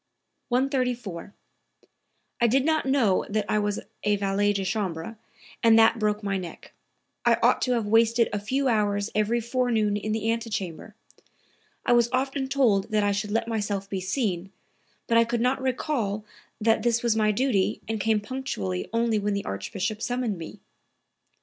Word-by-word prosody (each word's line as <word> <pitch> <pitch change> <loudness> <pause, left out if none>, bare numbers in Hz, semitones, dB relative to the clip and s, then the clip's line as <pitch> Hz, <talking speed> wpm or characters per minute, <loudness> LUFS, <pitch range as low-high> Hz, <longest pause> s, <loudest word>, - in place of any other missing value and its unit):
134. 250 - -1 1.1
"I 235 - +5
did 265 +4 +2
not 315 -3 +1
know 250 -9 +3
that 210 0 0
I 215 - +1
was 205 0 -1 0.2
a 210 0 +2
valet 200 +1 +1
de 195 -1 -2
chambre, 190 -1 -3 0.5
and 225 -1 +6
that 225 +1 +5
broke 210 0 0
my 195 -1 -1
neck. 175 -2 -9 0.5
I - - +4
ought - - +4
to 250 - +1
have 230 -3 0
wasted 230 +2 +4
a 205 - 0
few 265 +7 -1
hours 205 -3 +1
every 215 +3 +1
forenoon 235 -3 0
in 210 +1 -3
the 220 +1 0
antechamber. 215 -3 -4 0.9
I - - +4
was 240 -1 +4
often 265 +1 -1
told 245 -8 +2
that 215 -1 +1
I 205 - +2
should 205 +1 -2
let 225 +2 0
myself 205 -3 -2
be 190 -2 -2
seen, 190 -2 -2 0.5
but 230 0 +3
I - - +6
could 235 +1 -2
not 255 +3 +1
recall 245 -6 -1 0.3
that 225 0 +2
this 235 +1 +1
was 235 -2 +2
my 215 -1 +3
duty 210 -4 +1
and 220 0 -2
came 220 0 +2
punctually 155 - -4
only 230 -1 +1
when 205 0 -1
the 200 - -3
Archbishop 195 - -3
summoned 245 -6 -2
me." 165 - -9
220 Hz, 170 wpm, -26 LUFS, 205-240 Hz, 1.1 s, and